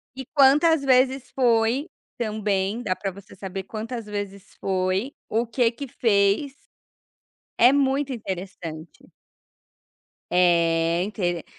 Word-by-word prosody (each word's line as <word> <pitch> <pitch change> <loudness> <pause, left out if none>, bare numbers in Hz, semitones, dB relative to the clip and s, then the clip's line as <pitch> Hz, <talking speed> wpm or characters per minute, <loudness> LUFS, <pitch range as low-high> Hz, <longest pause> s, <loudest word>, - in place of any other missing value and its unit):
e 265 0 -7
quantas 295 +3 +5
vezes 260 0 +2
foi, 240 +3 +2 0.3
também 210 -1 -1
dá 185 -4 -1
para 195 0 -4
você 195 +2 -14
saber, 195 0 -6
quantas 225 +3 -6
vezes 200 -1 -7
foi, 190 +7 -1 0.2
o 230 +2 0
que 235 0 +1
que 275 +4 -7
fez. 215 +3 +1 1.1
É 245 +3 +7
muito 275 0 +1
interessante. 180 - -7 1.2
É, 170 -1 +3
intere 175 -5 -2
215 Hz, 110 wpm, -24 LUFS, 190-255 Hz, 1.2 s, É